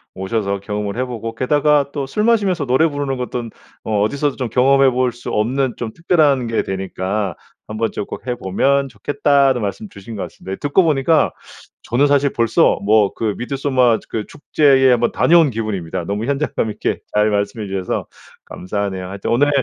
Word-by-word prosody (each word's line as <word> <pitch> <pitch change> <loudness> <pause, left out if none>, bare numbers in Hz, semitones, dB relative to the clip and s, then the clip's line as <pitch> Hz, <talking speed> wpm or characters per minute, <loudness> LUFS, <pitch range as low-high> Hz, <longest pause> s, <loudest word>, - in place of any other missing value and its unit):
오셔서 100 +1 -2
경험을 105 +1 -4
해보고, 115 -3 -4
게다가 145 +3 +2
또 140 -2 -2
술 135 +11 -2
마시면서 200 -9 +2
노래 130 +6 +3
부르는 145 -3 -3
것돈 125 -1 -4 0.4
어 105 -1 +2
어디서도 140 +6 0
좀 125 -3 -3
경험해 135 +3 +4
볼 125 0 +1
수 120 - -8
없는 125 +4 0
좀 110 -2 -5
특별한 150 -7 +2
게 115 - 0
되니까 95 0 -3 0.3
"한번 110 +1 -2
좀 - - -3
꼭 115 - -9
해 125 - -1
보면 135 +7 +1
좋겠다."는 140 +2 +1
말씀 100 +1 -4
주신 100 +3 -10
것 - - -3
같습니다. 95 0 -7
듣고 145 +6 +2
보니까 155 0 +2 0.5
저는 135 +5 +2
사실 140 -1 +2
벌써 115 -2 +3
뭐 105 -1 +3
그 110 -2 -2
미드소마 130 -3 +1
그 110 -2 -3
축제에 135 -3 +3
한번 120 -1 +2
다녀온 165 -3 +4
기분입니다. 105 -8 -3
너무 100 +5 -3
현장감 140 -5 -1
있게 - - -2 0.2
잘 105 +1 +3
말씀해 100 +1 -2
주셔서 95 -1 -3 0.4
감사하네요. 95 -1 -4
하여튼 100 +1 -5
오늘 140 +5 +3
120 Hz, 370 characters per minute, -19 LUFS, 105-140 Hz, 0.5 s, 경험해